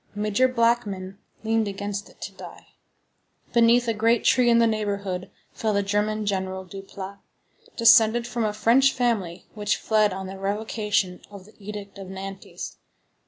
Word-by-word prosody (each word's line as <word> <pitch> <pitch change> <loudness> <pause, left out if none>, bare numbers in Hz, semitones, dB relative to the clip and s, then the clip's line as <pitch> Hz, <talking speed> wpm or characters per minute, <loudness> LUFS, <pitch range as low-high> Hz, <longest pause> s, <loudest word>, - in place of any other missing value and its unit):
Major 210 +4 +2
Blackmann 220 -6 0 0.2
leaned 225 -1 +1
against 200 +1 -4
it - - -22
to - - -5
die. - - -12 0.8
Beneath 235 +1 +4
a 230 - +2
great 225 +2 +2
tree 250 -2 +4
in 235 - +5
the 235 - +5
neighborhood 200 -4 -2 0.2
fell 220 -2 -1
the 200 0 +1
German 210 +2 0
general, 190 -1 -2
Duplat, 195 +1 -9 0.6
descended 230 0 +6
from 240 -1 -2
a 215 - +1
French 235 +6 +4
family 220 -9 -1
which 210 -1 -1
fled 215 -2 +2
on 190 +1 -5
the 190 +1 -8
revocation 205 -2 -1
of 200 -2 -12
the 215 - -18
Edict 205 -1 -8
of 195 - -8
Nantes. 190 0 -8
210 Hz, 155 wpm, -25 LUFS, 195-230 Hz, 0.8 s, descended